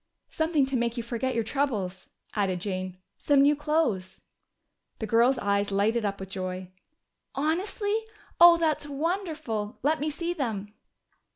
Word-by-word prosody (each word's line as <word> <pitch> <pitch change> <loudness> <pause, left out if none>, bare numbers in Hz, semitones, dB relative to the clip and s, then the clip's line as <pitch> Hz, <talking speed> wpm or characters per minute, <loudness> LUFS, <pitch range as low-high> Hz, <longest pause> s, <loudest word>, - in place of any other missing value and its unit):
"Something 315 -3 +2
to 265 0 -2
make 235 0 0
you 235 - -2
forget 240 +2 -2
your 230 - +1
troubles," 215 -8 -2 0.2
added 195 -4 0
Jane. 185 -1 -4 0.2
"Some 280 -1 +4
new 290 +1 +5
clothes." 290 - 0 0.8
The 220 - -3
girl's 235 +4 +4
eyes 200 -2 +1
lighted 215 +3 +1
up 200 -1 -2
with 190 0 -8
joy. 185 -1 -4 0.7
"Honestly? 410 - -1 0.3
Oh, 345 0 +9
that's 315 -3 0
wonderful! 300 - -3
Let 305 +3 +2
me 300 +2 -1
see 340 +3 -2
them!" 215 - -3
245 Hz, 145 wpm, -27 LUFS, 200-310 Hz, 0.8 s, Oh